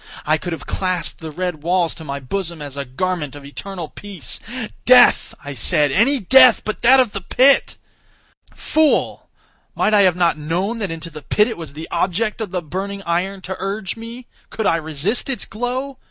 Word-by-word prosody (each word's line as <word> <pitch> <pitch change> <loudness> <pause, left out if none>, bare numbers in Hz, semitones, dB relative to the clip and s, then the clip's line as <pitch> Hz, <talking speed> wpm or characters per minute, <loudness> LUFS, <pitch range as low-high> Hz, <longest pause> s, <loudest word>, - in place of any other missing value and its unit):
I 155 +1 +2
could 175 - -5
have 165 - -6
clasped 185 -3 -3
the 160 - -7
red 175 0 -4
walls 175 +1 +1
to 160 - -11
my 140 -2 -5
bosom 170 +5 -4
as 145 -2 -8
a 140 -1 -4
garment 150 +2 -3
of 145 -1 -11
eternal 175 +4 -7
peace. 195 -2 -3 0.4
"Death," 250 -1 +5
I 145 - -5
said, 145 +4 +3
"any 260 - +3
death 255 +3 +6
but 215 - -4
that 260 +3 +6
of 250 -5 +3
the 195 - -5
pit!" 265 +8 +3 0.7
Fool! 315 -1 0 0.5
might 215 - +1
I 205 - +6
have 185 -3 +4
not 170 -3 +1
known 180 +9 -2
that 200 -3 -3
into 165 +1 -6
the 150 0 -9
pit 210 +9 +2
it 230 - -4
was 160 -5 -9
the 160 +2 -8
object 205 +6 -1
of 215 - -3
the 180 -1 -3
burning 195 +5 -5
iron 185 +3 -2
to 190 0 -5
urge 195 0 -3
me? 230 +2 -9 0.2
Could 220 - -4
I 165 - +3
resist 160 - -2
its 265 - -3
glow? 255 +4 -4
185 Hz, 195 wpm, -20 LUFS, 160-215 Hz, 0.7 s, death